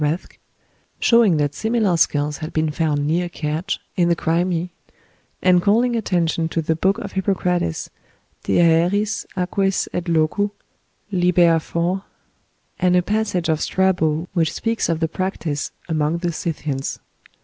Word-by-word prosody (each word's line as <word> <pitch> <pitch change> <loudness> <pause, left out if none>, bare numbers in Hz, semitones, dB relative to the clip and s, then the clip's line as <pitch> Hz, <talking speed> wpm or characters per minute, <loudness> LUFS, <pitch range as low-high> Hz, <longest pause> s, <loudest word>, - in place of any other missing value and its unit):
Rathke, 155 +4 -2 0.6
showing 230 -8 +4
that 145 -1 0
similar 220 -3 +1
skulls 150 -2 +1
had 155 +1 -7
been 155 -1 0
found 150 -2 0
near 175 +3 0
Kertsch, 160 +4 -3 0.2
in 175 -2 +2
the 170 - +3
Crimea, 170 +1 0 0.7
and 180 -1 +5
calling 235 +6 +2
attention 170 -6 0
to 165 - -1
the 160 +1 0
book 190 +5 +1
of 200 - -6
Hippocrates, 180 - -1 0.5
"De - - +2
Aeris, 175 +5 +2
Aquis 195 +1 0
et 175 - -2
Locu," 165 +5 +1 0.6
lib. 180 -2 +1
iv., 170 +2 +2 0.8
and 180 -1 +3
a 180 - +3
passage 205 -3 -1
of 160 -1 +1
Strabo, 175 -4 +1
which 165 -4 +1
speaks 225 -4 -1
of 165 -1 -1
the 160 - +2
practice 165 -4 -3 0.2
among 155 0 0
the 175 0 -2
Scythians. 150 -4 -3
175 Hz, 140 wpm, -21 LUFS, 160-190 Hz, 0.8 s, and